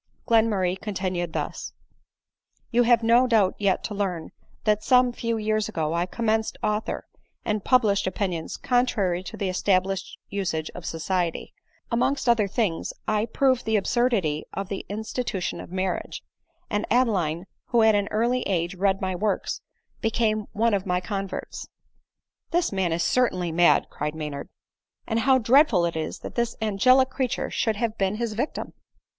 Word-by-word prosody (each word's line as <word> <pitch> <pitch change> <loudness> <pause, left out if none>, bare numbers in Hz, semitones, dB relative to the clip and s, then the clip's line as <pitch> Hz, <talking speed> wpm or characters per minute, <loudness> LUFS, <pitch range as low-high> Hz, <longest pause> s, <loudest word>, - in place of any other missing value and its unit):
Glenmurray 205 -5 +2
continued 185 -5 -3
thus: - - -4 0.5
" - - -46
You 240 0 +4
have 235 -1 +4
no 235 +3 +5
doubt 215 -6 +3
yet 200 -2 +1
to 210 - -4
learn, 185 -5 -3 0.3
that 215 -1 +2
some 250 -1 +4
few 230 -1 -2
years 215 0 0
ago 160 -6 -2
I 170 +1 0
commenced 220 +1 -1
author, 210 0 -1 0.4
and 210 -2 -1
published 210 -7 +3
opinions 185 -4 -3
contrary 220 -8 +1
to 190 - -8
the 195 - -1
established 190 0 0
usage 170 -6 -2
of 180 - -8
society; 170 +1 -2 0.4
amongst 250 +3 +1
other 230 -4 +4
things 195 -4 -1
I 215 +1 +1
proved 260 +2 +1
the 220 - +1
absurdity 200 -8 +1
of 195 -1 -4
the 195 - -5
institution 220 -1 -3
of - - -11
marriage; 185 0 -3 0.4
and 210 -1 -2
Adeline, 190 -9 +1 0.2
who 235 -2 +3
at 220 0 +6
an 205 -1 +1
early 240 +4 +1
age 175 -1 0
read 195 +1 +1
my 190 -1 -1
works, 205 +2 -1 0.4
became 215 -2 0
one 230 +1 +2
of 195 -1 -1
my 180 0 +1
converts." 195 +1 -5 0.4
" - - -63
The 345 0 +2
man 190 -3 0
is 170 +1 0
certainly 185 -7 +1
mad," 170 +1 +4
cried 150 +1 -3
Maynard, 150 -2 -5 0.3
" - - -48
and 225 0 0
ADELINE 230 - -2
MOWBRAY. 265 - +7
89 245 +5 +5
how 295 - +9
dreadful 190 - +1
it 170 - -2
is 160 -1 -3
that - - -7
this 235 -1 -1
angelic 255 +5 +4
creature 260 -3 -2
should 220 -2 0
have 225 0 -2
been 195 +1 +1
his 230 0 -2
victim." 245 +8 -3
210 Hz, 170 wpm, -25 LUFS, 185-230 Hz, 0.5 s, how